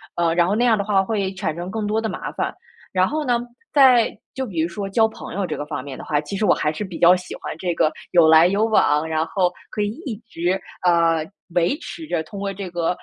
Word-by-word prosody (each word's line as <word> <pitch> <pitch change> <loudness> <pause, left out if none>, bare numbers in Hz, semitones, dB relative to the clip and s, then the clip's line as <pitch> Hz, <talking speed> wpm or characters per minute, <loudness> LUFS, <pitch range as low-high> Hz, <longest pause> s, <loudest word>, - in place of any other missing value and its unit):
呃， 170 -1 +1
然 175 0 +4
后 185 - 0
那 240 +3 +2
样 230 -3 +4
的 200 - -1
话 200 -1 +2
会 195 -2 -2
产 160 -4 -2
生 175 +2 -5
更 215 0 -2
多 215 +1 +1
的 220 - -2
麻 - - -5
烦。 - - -2 0.4
然 185 0 +3
后 310 +1 -2
呢， 245 -4 +1 0.3
在 255 -5 +6 0.2
就 265 - -2
比 190 -9 -5
如 160 - +2
说 195 +4 -5
交 220 +3 +3
朋 220 - -9
友 195 0 -2
这 - - -3
个 145 - -5
方 150 - -4
面 135 -1 -8
的 - - -8
话， 150 - 0
其 150 +7 -6
实 210 +2 0
我 - - +5
还 150 - 0
是 160 - -5
比 185 -4 -7
较 175 +1 +7
喜 180 -1 -7
欢 - - -7
这 175 +1 -2
个 155 - +3 0.2
有 170 -2 +6
来 160 +2 +7
有 200 +4 +2
往， 155 -8 +3
然 160 0 0
后 180 +2 +1 0.2
可 210 - -3
以 205 - 0 0.2
一 235 -7 -4
直， 180 -1 -1 0.2
呃， 165 -2 +3 0.3
维 175 - +2
持 330 -2 -8
着 170 - -1
通 180 +6 -10
过 200 0 -2
这 195 -1 -6
个， 170 -1 -1
185 Hz, 280 characters per minute, -22 LUFS, 165-215 Hz, 0.4 s, 较